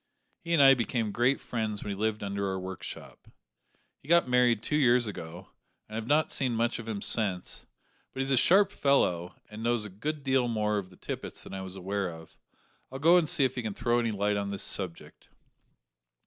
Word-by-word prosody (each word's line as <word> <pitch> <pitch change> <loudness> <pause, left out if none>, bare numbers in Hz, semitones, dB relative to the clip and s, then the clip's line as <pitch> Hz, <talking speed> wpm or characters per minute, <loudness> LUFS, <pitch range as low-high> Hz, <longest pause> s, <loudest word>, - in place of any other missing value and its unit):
He 170 - -7
and 150 -4 +6
I 135 0 +9
became 115 -3 -1
great 125 +5 +2
friends 110 -3 -4
when 105 - -4
he - - -3
lived 110 +1 -1
under 100 0 -2
our 95 0 -2
workshop. 95 0 -8 0.7
He - - -20
got 170 -3 +4
married 125 -3 +3
two 150 - -1
years 125 -4 +4
ago, 90 -3 -8 0.4
and 110 - -13
I - - -1
have 115 - -7
not 150 +3 +2
seen 125 -3 +1
much 115 +1 0
of 115 - -8
him 105 -3 -4
since, 95 -5 0 0.4
but 135 - -4
he's 135 +1 -2
a - - +4
sharp 195 +9 +5
fellow, 90 - +1 0.2
and 105 +1 -8
knows 120 -1 0
a - - -7
good 145 +10 -5
deal 130 -2 +2
more 105 -2 0
of 95 -2 -8
the 90 - -18
Tippets - - -6
than - - -10
I 95 - -4
was 95 0 -8
aware 95 0 -2
of. 80 -1 -12 0.6
I'll 135 - -5
go 165 +6 +5
and 165 -4 +1
see 140 - +3
if 130 - -1
he 125 - -3
can 110 -3 -4
throw 120 +1 +1
any 115 -1 0
light 105 -1 0
on 100 0 -2
this 100 -1 -4
subject." 90 -4 -6
110 Hz, 220 wpm, -29 LUFS, 100-130 Hz, 0.7 s, I